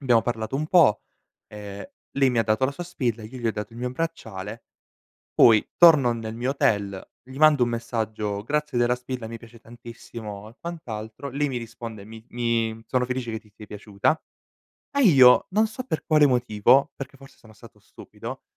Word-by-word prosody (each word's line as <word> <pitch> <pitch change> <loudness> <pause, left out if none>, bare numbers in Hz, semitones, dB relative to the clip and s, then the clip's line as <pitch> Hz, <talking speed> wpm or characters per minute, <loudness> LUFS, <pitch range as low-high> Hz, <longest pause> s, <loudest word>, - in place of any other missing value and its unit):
Abbiamo 120 -5 +3
parlato 115 +1 -3
un 155 +2 -2
po', 155 - +4 0.5
ehm, 100 -1 -8 0.3
lei 135 -1 +3
mi 120 -2 +2
dato 110 +4 +1
la 130 - +1
sua 175 +5 -7
spilla 120 -10 -2
e - - -7
io 130 +4 -11
gli 120 - -3
ho - - +3
dato 105 +2 -6
il - - -10
mio 125 +1 -3
bracciale 115 -8 -5 0.7
poi, 110 -3 +5
torno 150 -8 +6
nel 115 -1 -6
mio 125 +2 -1
hotel, 100 -8 0 0.2
gli 130 +1 -13
mando 150 -4 +5
un 120 - -2
messaggio: 110 -3 -3
"Grazie 150 0 -1
della 120 0 +3
spilla 125 -1 -6
mi 115 +1 -7
piace 115 0 -15
tantissimo", 115 -3 -10
e - - -20
quant'altro, 125 -6 -7
lei 145 +2 -1
mi 130 - -4
risponde: 115 -3 -8
"Mi 110 +1 -12
mi 115 -2 -1
sono 125 -1 0
felice 125 -2 -3
che 110 - -4
ti 105 - -24
sia 105 +1 -13
piaciuta", 105 +9 -1 0.7
e 280 - 0
io, 130 - +7
non 215 +4 +3
so 220 +4 -7
per 160 - -3
quale 150 -2 +5
motivo, 125 0 +3
perché 135 0 -9
forse 135 0 -17
sono 110 -1 -18
stato 100 - -16
stupido, - - -10
120 Hz, 190 wpm, -24 LUFS, 110-135 Hz, 0.7 s, io